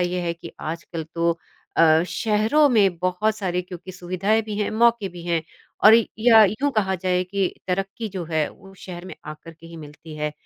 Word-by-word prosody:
ये 180 0 -1
है 170 -1 -1
कि 170 0 -11
आजकल 165 0 -5
तो 170 0 0 0.4
अ, 160 0 +5
शहरों 225 +7 +2
में 200 -7 +3
बहुत 185 +5 0
सारी 180 -3 -1
क्योंकि 180 +1 -10
सुविधाएँ 185 +5 0
भी 210 -1 -6
हैं, 210 - -1
मौके 230 -2 +2
भी 175 -1 -10
हैं 170 -2 -1 0.4
और 215 +1 +10 0.2
या 225 -1 +7
यूँ 220 +9 0
कहा 190 -2 +1
जाए 180 0 0
कि 195 0 -1 0.2
तरक्की 195 +4 -2
जो 180 -3 -3
है, 155 -2 +1
वो 195 0 -16
शहर 180 -1 -9
में - - -8
आकर 155 +2 -9
के 165 +1 -16
ही 165 0 -11
मिलती 155 +1 -11
है। 150 0 -2
180 Hz, 195 wpm, -23 LUFS, 170-210 Hz, 0.4 s, और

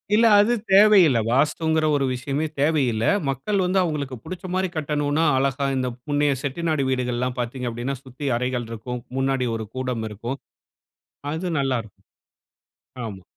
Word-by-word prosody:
இல்ல 230 +2 +5
அது 225 +4 +4 0.2
தேவையில்ல. 195 - +7
வாஸ்துங்குற 155 +4 +2
ஒரு 140 -1 +1
விஷயமே 135 +4 -2
தேவையில்ல. 135 -7 +2 0.2
மக்கள் 135 +11 -1
வந்து 185 +1 +2
அவுங்களுக்கு 145 -6 -2
புடிச்ச 185 +1 -7
மாரி 190 0 +1
கட்டனுன்னா, 150 0 0
அழகா 140 +1 0
இந்த 130 -1 0 0.2
முன்னைய 145 -1 +2
செட்டிநாடு 155 +1 -1
வீடுகள்லாம் 125 -1 -1
பாத்தீங்க 125 +1 -3
அப்டின்னா, 120 +4 -3
சுத்தி 130 +3 -6
அறைகள் 125 -1 -2
இருக்கும். 120 +2 -5 0.2
முன்னாடி 135 -1 +1
ஒரு 110 - -4
கூடம் 125 -3 -2
இருக்கும். 120 +6 -5 0.9
அது 175 +3 -3
நல்லா 135 -3 +1
இருக்கும். 110 - -20 1.0
ஆமா. 95 -4 -9
135 Hz, 140 wpm, -23 LUFS, 125-155 Hz, 1.0 s, தேவையில்ல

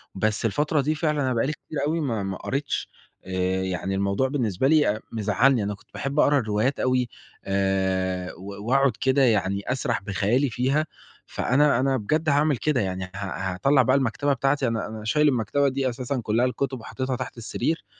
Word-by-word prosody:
بس 110 +3 0
الفترة 150 +6 +1
دي 155 +3 0
فعلًا 150 -2 0
أنا 130 -1 +1
بقى 115 +1 +1
لي 150 - 0
كتير 155 - -9
أوي 165 +2 0
ما 115 -9 -1
ما 95 -1 -3
قريتش 140 +1 -3 0.4
آآ، 95 0 -1
يعني 95 +1 -2
الموضوع 100 +6 +1
بالنسبة 130 -4 0
لي 155 -4 +4
أ - - -10
مزعّلني، 110 +2 +2
أنا 105 0 -2
كنت - - -25
باحب 140 +2 -2
أقرا 145 -1 +5
الروايات 110 +3 0
أوي 125 -2 +1 0.4
آآ، 95 -1 0
و 100 +3 -9
وأقعُد 135 +1 +4
كده 135 +1 +3
يعني 100 -5 +2
أسرَح 130 -1 -1
بخيالي 105 +7 +1
فيها. 135 +6 +1 0.4
فأنا 140 0 +2
أنا 135 0 +2
بجد 155 +8 0
هاعمل 145 0 +3
كده 145 -2 +1
يعني 95 -1 -2
ه 90 - -7
هاطلّع 100 +7 +1
بقى 130 +2 +3
المكتبة 140 +2 +1
بتاعتي، 135 0 +1
أنا 115 -1 -1
أنا 110 -1 -8
شايل 150 +7 +3
المكتبة 140 +2 +1
دي 135 0 -1
أساسًا 125 +2 -3
كلّها 115 +4 +2
الكتُب 130 +1 -2
وحطّيتها 130 +3 -3
تحت 120 - -6
السرير، 155 +7 -2
125 Hz, 185 wpm, -25 LUFS, 100-140 Hz, 0.4 s, أقرا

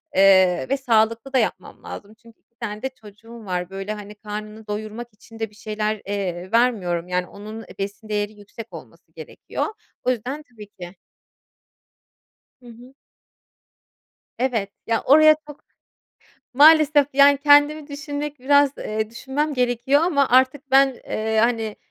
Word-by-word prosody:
eee, 190 -2 +5
ve 275 - +1
sağlıklı 230 0 +1
da - - +3
yapmam 190 -6 -3
lazım 205 +1 -9
çünkü 230 0 -21
2 235 - -52
tane 210 -2 -5
de 265 - -2
çocuğum 225 -1 -15
var, 180 -1 -3
böyle, 195 +2 -5
hani, 210 0 -10
karnını 215 +1 -8
doyurmak 215 +3 -5
için 225 +2 -16
de 225 -2 -3
bir 210 - -22
şeyler, 215 0 -3
eee, 190 -2 -4
vermiyorum, 195 -8 +1
yani, 180 0 -1
onun, 215 +2 -9
eee, - - -14
besin 205 +2 -6
değeri 210 0 -2
yüksek 210 +2 -12
olması - - -13
gerekiyor. - - -6 0.4
O 250 - 0
yüzden 255 +6 -4
tabii 215 -4 -13
ki. 180 -2 -11 1.7
Hı - - -19
hı. 245 +3 -15 1.5
Evet, 230 -6 -1 0.2
ya, 225 0 +1
oraya 310 +3 +6
çok 295 - -13 0.9
Maalesef 300 0 +6
ki, 290 - -26
yani, 280 0 +7
kendimi 290 +1 +4
düşünmek 290 0 -5
biraz, 285 +1 +4
eee, 215 0 -3
düşünmem 285 +5 -3
gerekiyor 250 +3 +1
ama 285 -6 +2
artık 260 +2 +2
ben, 270 -1 +5
eee, 220 0 -2
hani, 225 -2 0
225 Hz, 150 wpm, -22 LUFS, 210-270 Hz, 1.7 s, yani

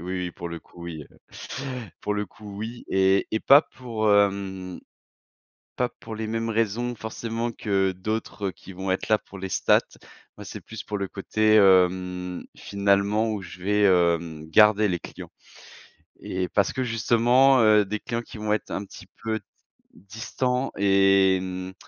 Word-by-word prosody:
oui, 90 +2 -5
oui - - -5
pour 85 0 -7
le 85 - -6
coup, 85 - -15
oui, 80 -3 -6
heu, - - -19 0.8
pour 105 - -2
le 105 0 -1
coup, 100 +1 -12
oui 115 +3 -6
et 95 0 +3
et 110 - -1
pas 140 +3 +7
pour, 110 -4 -1
hem, 95 -2 0 1.0
pas 125 - +1
pour 110 - -7
les 110 0 -4
mêmes 115 +1 -2
raisons 115 +2 -1
forcément 115 +1 -4
que 95 -3 0
d'autres 105 +1 -3
qui 95 - -13
vont 95 +1 -4
être 95 - -1
là 110 -1 +4
pour 95 - -13
les 95 0 -5
statistiques. - - +4 0.6
Moi - - -8
c'est - - -7
plus 110 -1 -8
pour 105 - -4
le 100 - -2
côté, 110 +3 +1
hem, 90 -2 +3
finalement 100 +2 +1
où 100 -2 -4
je 90 +1 -11
vais, 105 +2 +1
hem, 85 -4 +2
garder 105 +3 +5
les 90 -2 -1
clients - - -10 0.9
et 90 0 -3
parce 100 -2 +1
que 130 - -1
justement, 120 +4 +4
heu, 105 -1 +5
des 105 +2 -3
clients 115 0 -3
qui 115 - -12
vont 105 0 -1
être 110 - -3
un 100 - -3
petit - - -13 0.2
peu 110 -1 -1
d - - -30 0.5
distants 125 +6 -3
et 95 -1 +4
hem 95 0 -5
100 Hz, 175 wpm, -25 LUFS, 95-110 Hz, 1.0 s, pas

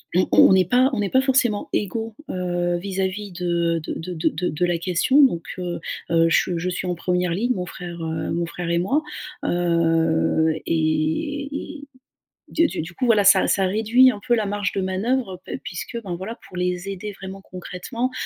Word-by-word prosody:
on 185 - +3
on - - +7
est 185 -1 +4
pas 255 +3 +4
on 220 - 0
est 200 - -1
pas 260 - +4
forcément 255 -6 +1
égaux 225 +3 -2 0.2
heu 175 -1 -1
vis-à-vis 190 +2 -3
de 170 -2 0
de - - -3
de 180 +2 -6
de 160 - +1
de 175 +4 -2
de 155 +4 0
la 175 -1 0
question 185 - +3
donc 170 -11 +2 0.2
heu 175 -1 -3 0.3
heu, 165 0 +4
je 175 +1 +2
je 175 +2 -2
suis 185 +1 -3
en 180 - -1
1re 180 +1 0
ligne, 235 +8 +1
mon 180 -4 -3
frère, 175 -1 -8
heu, 160 -1 -3
mon 170 0 0
frère 170 +1 -5
et 170 0 +2
moi. 260 - +1 0.4
Heu 165 -2 +2
et 165 - -1
et, 285 0 -7 0.6
du 330 +1 +3
du - - -4
du 170 +3 -9
coup 255 - -2
voilà, 215 -3 +5
ça 195 - +6
ça 195 - +2
réduit 225 +6 +5
un 210 - -7
peu 240 - +4
la 220 -2 0
marge 205 0 -1
de - - -1
manœuvre 190 +1 -1
pe - - -5
puisque 190 +6 -5
ben 180 -3 -4
voilà, 195 +7 -6
pour - - -13
les 180 +1 -2
aider 195 +2 -5
vraiment 195 0 -9
concrètement. 185 +8 -5
185 Hz, 200 wpm, -23 LUFS, 170-215 Hz, 0.6 s, on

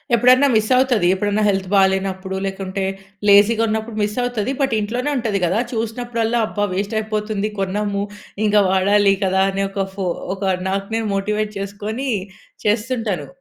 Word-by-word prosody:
ఎప్పుడైనా 255 +4 +5
మిస్ 215 0 +2
అవుతది. 245 -9 +3
ఎప్పుడన్నా 205 +2 0
హెల్త్ 190 -1 -1
బాలేనప్పుడు 190 0 +1
లేకుంటే 195 0 -3 0.4
లేజీగా 210 +3 +6
ఉన్నప్పుడు 220 +1 -3
మిస్ 210 +3 -2
అవుతది. 245 0 -1
బట్ 265 -4 +1
ఇంట్లోనే 245 +7 -2
ఉంటది 220 -5 -1
కదా 190 +6 +1
చూసినప్పుడల్లా 230 +1 -1
అబ్బా! 205 0 -1
వేస్ట్ 200 +3 -2
అయిపోతుంది 215 -1 -2
కొన్నాము 200 +1 -1 0.4
ఇంకా 210 0 +4
వాడాలి 200 +1 +4
కదా! 190 0 +2
అని 195 +1 -1
ఒక 195 0 -2
ఫొ 195 -2 -3 0.3
ఒక 195 - -8 0.3
నాకు 195 +1 -2
నేను 225 -1 -1
మోటివేట్ 210 +2 -1
చేసుకొని 210 +6 -4 0.6
చేస్తుంటాను. 220 -2 -1
210 Hz, 145 wpm, -20 LUFS, 195-225 Hz, 0.6 s, లేజీగా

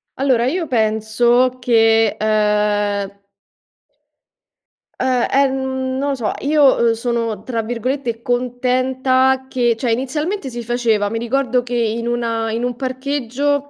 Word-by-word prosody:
Allora, 260 -3 +1
io 330 +6 -1
penso 235 +2 +2
che, 225 -3 +3
ehm 210 -2 0 1.8
uhm, 255 -2 +1
ehm, 265 -1 0
non 280 +2 -1
lo 280 - 0
so, 230 -5 -2
io, 285 -2 +4
ehm, - - +4
sono, 230 -3 -2
tra 230 -2 -3
virgolette, 240 +1 -3
"contenta" 255 +2 +1
che 240 -3 +1
cioè 235 +1 -2
inizialmente 295 - -2
si 240 0 -6
faceva 225 -3 0
mi 225 - -3
ricordo 250 +1 0
che 245 0 -4
in 230 0 -1
una 230 -2 -1
in 230 +2 -2
un 245 0 -2
parcheggio 275 +2 -2
245 Hz, 125 wpm, -18 LUFS, 225-260 Hz, 1.8 s, io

